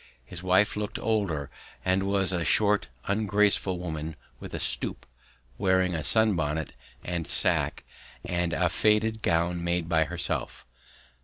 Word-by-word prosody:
His 85 +7 -8
wife 95 +3 +3
looked 105 0 -3
older 85 -11 -1 0.3
and 95 +1 +2
was 95 -1 +1
a 85 -2 0
short 105 +5 +3 0.2
ungraceful 100 -2 +1
woman 80 -2 -5 0.2
with - - -9
a - - -3
stoop, - - +1 0.5
wearing 95 -1 +2
a 80 - -2
sun 110 +7 +3
bonnet 80 -1 -2 0.3
and 85 -2 -3
sack - - +1 0.4
and 90 -1 -1
a 90 +1 +1
faded 105 +5 +1
gown 85 0 0
made 85 -1 -1
by 80 -1 +2
herself. 85 +3 -4
90 Hz, 140 wpm, -27 LUFS, 85-100 Hz, 0.5 s, wife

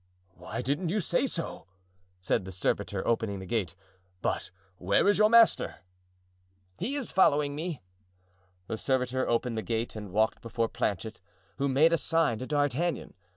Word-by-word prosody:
"Why 115 +6 -6
didn't 150 +6 -1
you 210 +5 +1
say 185 +7 +1
so?" 165 - -5 0.5
said 90 +1 0
the 95 - -7
servitor, 95 +1 -1
opening 110 -3 0
the 95 - -7
gate. 95 -5 -2 0.5
"But - - -1 0.3
where 100 - +2
is 205 0 +4
your 215 0 +6
master?" 230 -1 +5 1.0
"He 255 +9 -2
is 280 -4 -3
following 145 -5 +3
me." 155 - -4 0.8
The 110 - -4
servitor 130 -1 0
opened 115 -1 0
the - - -2
gate 115 +1 -2
and 105 -3 -7
walked 110 +3 +1
before 115 -1 -1
Planchet, 110 +2 -3 0.4
who 140 - 0
made 155 +5 +4
a 165 - +3
sign 160 -9 +1
to 130 - -5
D'Artagnan. 145 +2 0
130 Hz, 155 wpm, -29 LUFS, 110-165 Hz, 1.0 s, your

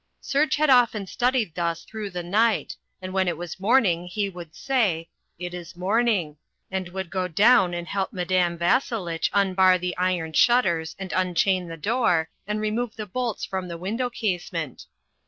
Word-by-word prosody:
Serge 290 +3 +1
had 300 -1 +3
often 230 -5 +4
studied 240 -3 0
thus 170 -1 -2
through 215 -2 -6
the 180 -2 -5
night 215 +5 +1 0.3
and 185 0 -5
when 190 -1 +1
it 170 -3 -1
was 175 +1 -7
morning 195 -5 +3
he 200 +2 -2
would 175 -4 -10
say, 205 -12 0 0.3
"It 175 +1 -6
is 175 -1 -8
morning," 190 -4 +1 0.3
and 190 -2 -3
would 190 -1 -5
go 185 -1 -1
down 185 0 +4
and 175 0 -5
help 195 +2 -2
Madame 180 -1 0
Vasselitch 175 -3 0
unbar 190 -2 +4
the 180 0 -3
iron 180 -3 -1
shutters 170 -8 +3
and 190 -1 -6
unchain 185 0 +1
the 165 0 -7
door, 175 -4 +1 0.2
and 210 0 -1
remove 215 +2 -2
the 215 - -5
bolts 235 +3 -3
from 190 -1 -4
the 170 -1 -6
window 225 +8 -2
casement. 175 - -3
185 Hz, 170 wpm, -25 LUFS, 175-220 Hz, 0.3 s, often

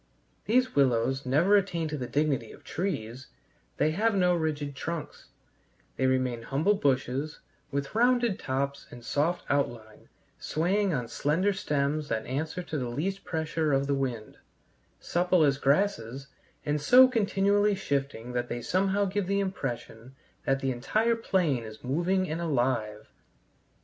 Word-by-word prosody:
These 255 +3 +2
willows 130 0 +2
never 165 +10 +4
attain 175 -5 +1
to 150 - -3
the 125 - -4
dignity 140 -5 0
of - - -15
trees; 130 - -4 0.5
they 155 - +2
have 210 +6 +1
no 180 -2 +3
rigid 150 -4 -2
trunks; 165 +2 -6 0.7
they 130 - +1
remain 130 -2 0
humble 145 - +1
bushes, 140 -3 -1 0.3
with 140 -1 -3
rounded 240 -2 +2
tops 140 +1 -3
and 120 -1 -12
soft 165 +7 0
outline, 120 -6 -2 0.3
swaying 190 +5 0
on 125 -7 -2
slender 165 - +1
stems 150 -4 -1
that 110 -4 -2
answer 155 +7 -3
to 155 -3 -4
the 125 -2 -3
least 190 +10 -3
pressure 160 -1 -1
of 135 0 +2
the 140 - 0
wind; 125 -5 -3 0.6
supple 175 -1 +2
as 140 -2 +2
grasses, 140 - 0 0.4
and 150 0 0
so 255 - +8
continually 205 -3 +2
shifting 140 -9 -3
that 120 0 -2
they 120 - -4
somehow 195 +2 +1
give 195 0 -2
the 200 +1 +1
impression 130 - -5 0.3
that 135 0 +1
the 135 - 0
entire 215 - +1
plain 175 - 0
is 110 -1 -10
moving 175 +8 0
and 165 +2 -3
alive. 120 -8 -1
150 Hz, 145 wpm, -28 LUFS, 130-190 Hz, 0.7 s, so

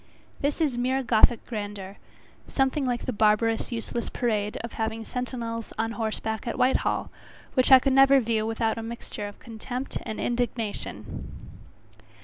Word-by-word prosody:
This 285 +3 0
is 280 -7 +1
mere 260 +2 +1
gothic 230 0 +4
grandeur, 205 -3 -5 0.5
something 270 0 +1
like 245 -1 -1
the 255 - -1
barbarous, 220 +2 +2
useless 235 0 -3
parade 210 -3 -1
of 235 - -6
having 225 0 -2
sentinels 230 -2 -4
on 225 0 0
horseback 220 +1 -3
at 235 - -2
Whitehall, 255 +1 +1 0.4
which 255 0 +3
I 265 - +12
could 265 +1 +1
never 270 +1 +7
view 220 -2 0
without 225 0 0
a - - -3
mixture 225 -2 -6
of 205 - -10
contempt 245 +3 -5
and 220 - -5
indignation. 235 -3 -3
230 Hz, 145 wpm, -27 LUFS, 220-255 Hz, 0.5 s, I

